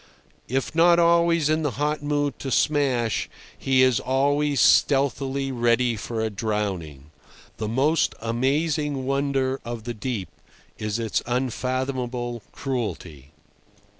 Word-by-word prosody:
If 135 +4 -2
not 170 +1 +5
always 170 -2 +3
in 155 +1 +1
the 150 - 0
hot 150 +1 -1
mood 145 -1 -1
to 135 - -4
smash, 130 -5 +1 0.3
he 130 -1 +2
is 130 -2 +3
always 140 +1 +1
stealthily 135 -1 +2
ready 120 -1 +2
for 110 +2 -4
a 110 0 -1
drowning. 95 -9 -3 0.5
The 110 - -3
most 140 +8 +1
amazing 140 +4 -1
wonder 135 -1 0
of 120 -2 -6
the 120 +1 -4
deep 105 -5 -4 0.5
is 105 0 -2
its 115 -2 -1
unfathomable 125 -1 -2
cruelty. 90 - -5
130 Hz, 120 wpm, -24 LUFS, 115-145 Hz, 0.5 s, not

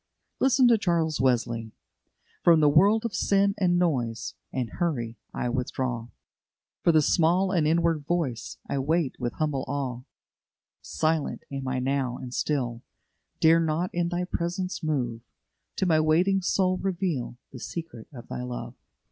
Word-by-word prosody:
Listen 265 -1 +4
to 230 -2 +5
Charles 165 -6 0
Wesley: 115 -3 0 0.7
"From 170 -2 +6
the 150 -1 +5
world 205 +9 +4
of 230 - -2
sin, 200 +1 +2
and 175 -2 +3
noise, 125 -10 -1 0.2
And 125 -3 -2
hurry, 120 - -1
I - - -2
withdraw; 125 -1 -2 0.8
For 170 - +5
the 155 -2 +4
small 180 +5 +3
and 165 -5 +2
inward 165 -2 +1
voice 155 -10 -2
I 140 - -1
wait 155 0 0
with 120 -2 -2
humble 150 -4 -1
awe; 130 -3 -3 0.8
Silent 155 -1 -1
am 135 -1 -4
I 130 0 -1
now 130 -1 -1
and 125 -1 -8
still, 125 -6 -1 0.6
Dare 165 +1 +6
not 165 +2 0
in 175 0 0
Thy 175 0 -1
presence 180 +1 -3
move; 125 -7 -1 0.5
To - - 0
my 160 -3 +4
waiting 175 +5 +3
soul 185 0 +1
reveal 175 -11 -2
The 125 - -9
secret 160 -6 -7
of 120 -4 -11
Thy - - -5
love." 125 -1 -5
155 Hz, 150 wpm, -27 LUFS, 125-175 Hz, 0.8 s, From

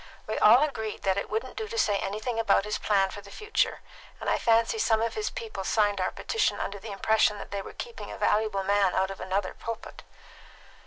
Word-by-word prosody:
We 215 - -2
all 240 +7 +7
agreed 220 -8 -3
that 190 -1 +2
it - - -5
wouldn't 225 +4 -3
do 440 0 -3
to 460 +1 -6
say 205 - +2
anything 215 +4 -3
about 205 -3 +3
his 210 - -2
plan 195 -2 +2
for 205 - -8
the 200 - -14
future, 425 - -1 0.4
and - - -1
I - - +2
fancy 230 - +3
some 220 - +3
of 230 +1 -1
his 425 0 -2
people 450 - -6
signed 205 0 +2
our - - +1
petition 450 - -1
under 200 0 -4
the 210 +2 -8
impression 210 +1 +2
that - - -9
they 200 -1 -2
were - - -9
keeping 475 -2 -7
a - - -7
valuable 210 -2 +1
man 200 -1 +2
out 190 +1 +1
of 195 - -8
another 190 0 -1
pulpit." 230 -1 -7
215 Hz, 220 wpm, -28 LUFS, 200-230 Hz, 0.4 s, all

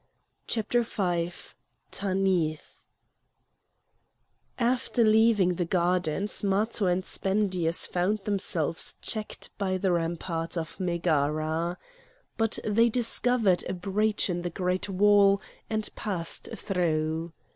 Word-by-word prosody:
CHAPTER 235 +2 +1
V 175 -6 -1 0.6
TANITH 185 -5 -1 1.7
After 245 0 +1
leaving 215 -4 +4
the 175 0 -2
gardens 180 +2 0
Matho 205 +1 +1
and 180 +1 0
Spendius 190 -4 +1
found 185 +4 0
themselves 175 -6 -1
checked 215 -1 -4
by 190 -2 0
the 185 0 0
rampart 165 0 -2
of 165 +2 -5
Megara. 165 -1 0 0.6
But 225 0 +1
they 230 +3 +3
discovered 230 -4 +2
a - - -1
breach 205 +4 0
in 175 -2 -2
the 175 - -3
great 180 +3 -2
wall 200 0 +5 0.3
and 215 -1 -1
passed 175 -6 -1
through. 165 -3 -1
185 Hz, 105 wpm, -27 LUFS, 170-210 Hz, 1.7 s, wall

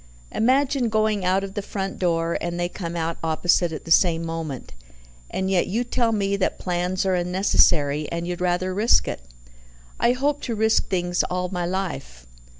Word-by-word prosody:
Imagine 260 +1 +2
going 215 -2 +1
out 185 +2 +2
of 195 -1 -6
the 205 - -3
front 195 -1 -5
door, 170 -2 0
and 175 0 -3
they 175 - 0
come 175 -1 -6
out 165 0 -2
opposite 165 +2 +2
at 155 - -7
the 165 - -7
same 165 -1 +4
moment. 165 -5 -5 0.6
And 190 - -2
yet 190 -2 +2
you 225 +6 0
tell 240 -1 0
me 200 -2 0
that 190 - -1
plans 180 +1 -1
are 190 - +2
unnecessary, 175 -5 +2
and 170 0 -3
you'd 180 0 -4
rather 180 +1 0
risk 215 +5 +3
it." - - -4 0.8
"I 240 - +3
hope 285 +3 -1
to 235 - -3
risk 220 +1 +2
things 175 -1 0
all 180 0 -2
my 175 -2 -2
life." 170 - -4
180 Hz, 180 wpm, -23 LUFS, 170-205 Hz, 0.8 s, same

